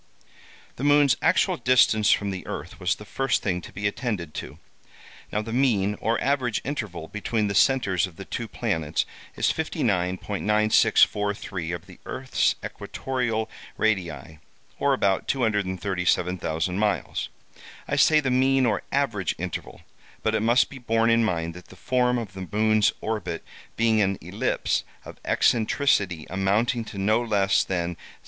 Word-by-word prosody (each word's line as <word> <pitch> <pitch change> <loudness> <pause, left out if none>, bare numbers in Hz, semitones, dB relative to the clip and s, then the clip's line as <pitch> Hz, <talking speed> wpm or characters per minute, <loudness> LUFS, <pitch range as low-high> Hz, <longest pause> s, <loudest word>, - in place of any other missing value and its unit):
"The 130 - -5
moon's 145 -3 +5
actual - - +3
distance 110 -4 +4
from 100 -1 +2
the 95 -1 -6
earth 80 +8 -6
was 90 -1 +1
the 105 - -12
first 135 +6 0
thing 90 -3 -1
to - - -11
be 100 - -5
attended 100 - -2
to. - - -7 0.7
Now, 105 - -1
the 115 +1 -6
mean 110 -6 +2
or 115 - +1
average 130 -7 0
interval 105 - -4
between 105 +2 -1
the 100 - -2
centres 95 -5 +3
of 90 - -15
the - - -9
two - - -4
planets 80 -2 -1 0.3
is - - +1
59.9643 105 - +1
of 85 0 -10
the 95 -2 -15
earth's 130 0 0
equatorial 120 -4 -3 0.3
radii, 90 -7 -1 0.4
or 140 - +1
only 135 - +4
about 95 -6 +1
237,000 95 - 0
miles. 105 -1 -1 0.6
I - - -1
say 155 -1 +5
the 135 -3 -1
mean 130 +1 +3
or 105 -4 +1
average 115 -10 0
interval, 90 -2 -6 0.4
but 110 - +1
it 110 - +1
must 120 +3 +3
be 135 - -9
borne 115 -1 +2
in 115 0 +4
mind 85 -5 -1
that 90 +1 -12
the - - -14
form 125 +4 +1
of 110 -5 -5
the 95 -1 -7
moon's 110 0 +3
orbit 110 -5 -3 0.3
being 115 -1 +3
an 95 -1 +1
ellipse - - -1 0.2
of - - -11
eccentricity 105 - +2
amounting 105 +6 +1
to 100 - -9
no 110 +4 +2
less 100 -4 +2
than 85 -2 -2
0. - - -22
105 Hz, 155 wpm, -25 LUFS, 95-120 Hz, 0.7 s, moon's